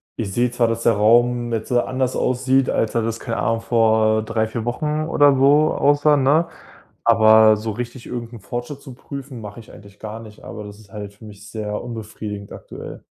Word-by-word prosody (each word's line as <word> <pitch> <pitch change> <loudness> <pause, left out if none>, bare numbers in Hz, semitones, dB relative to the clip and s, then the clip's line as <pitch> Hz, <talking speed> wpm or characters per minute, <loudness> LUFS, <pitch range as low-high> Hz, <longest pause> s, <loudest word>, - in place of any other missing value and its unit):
ich 100 -4 -4
sehe 120 0 +1
zwar, 120 -1 +1
dass 115 0 -2
der 115 - +3
Raum 120 +3 +3
jetzt 110 +2 -3
anders 130 +1 0
aussieht, 130 +1 +1
als 115 - -1
er 115 - +1
das 115 0 -3
keine 115 -2 -4
Ahnung, 115 0 0
vor 110 -2 +2
3, 110 0 -1
4 110 +1 -5
Wochen 150 +5 -2
oder 145 -3 +4
so 145 +3 +4
aussah, 145 +1 +3
ne? 145 +5 +3 0.6
Aber 110 -1 +6
so 110 +1 -4
richtig 120 +3 -7
irgend 120 -1 -6
'n 115 - -9
Fortschritt 120 +8 -6
zu 130 - -11
prüfen 135 -1 -9
mache 105 +2 -9
ich 110 - -14
eigentlich 100 -1 -15
gar 110 +1 -7
nicht, 110 -2 -13
aber 105 - -8
das 105 0 -10
ist 105 -2 -19
halt 100 -1 -8
für 110 - -15
mich 105 0 -13
sehr 105 -1 -4
unbefriedigend 105 -3 -7
aktuell. - - -10
115 Hz, 200 wpm, -21 LUFS, 110-125 Hz, 0.6 s, Aber